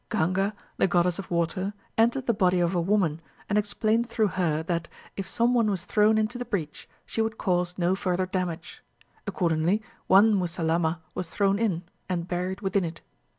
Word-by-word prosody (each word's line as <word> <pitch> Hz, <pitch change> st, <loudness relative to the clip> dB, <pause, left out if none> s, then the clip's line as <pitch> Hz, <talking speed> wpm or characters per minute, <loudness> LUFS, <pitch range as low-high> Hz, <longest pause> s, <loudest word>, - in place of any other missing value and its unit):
Ganga, 195 Hz, +5 st, 0 dB, 0.2 s
the -, -, +3 dB
goddess 175 Hz, 0 st, +2 dB
of 195 Hz, -, -7 dB
water, 180 Hz, +4 st, -1 dB, 0.2 s
entered 235 Hz, +4 st, +2 dB
the 235 Hz, -, +2 dB
body 185 Hz, -3 st, +2 dB
of 175 Hz, +1 st, +1 dB
a 175 Hz, -, +1 dB
woman, 170 Hz, -4 st, +1 dB, 0.3 s
and 205 Hz, -, 0 dB
explained 215 Hz, +3 st, +1 dB
through 220 Hz, -2 st, +1 dB
her 160 Hz, -4 st, 0 dB
that, 170 Hz, 0 st, -2 dB, 0.3 s
if 195 Hz, -, -4 dB
some 240 Hz, +1 st, +2 dB
one 230 Hz, -3 st, +3 dB
was 185 Hz, -3 st, -2 dB
thrown 215 Hz, +1 st, +3 dB
into 220 Hz, +3 st, 0 dB
the -, -, -2 dB
breach, 160 Hz, -10 st, -4 dB, 0.2 s
she 225 Hz, -, -2 dB
would 220 Hz, 0 st, -1 dB
cause 180 Hz, -1 st, 0 dB
no 180 Hz, +1 st, +2 dB
further 185 Hz, -1 st, 0 dB
damage. 180 Hz, -3 st, -4 dB, 0.5 s
Accordingly, 180 Hz, +1 st, +1 dB, 0.2 s
one 205 Hz, +3 st, +6 dB
Musalamma 170 Hz, -3 st, 0 dB
was 180 Hz, -3 st, -4 dB
thrown 200 Hz, +1 st, +1 dB
in, 190 Hz, -7 st, 0 dB, 0.3 s
and 175 Hz, -2 st, -2 dB
buried 180 Hz, +1 st, -3 dB
within 195 Hz, -1 st, +1 dB
it. 165 Hz, 0 st, -5 dB
185 Hz, 180 wpm, -27 LUFS, 175-210 Hz, 0.5 s, one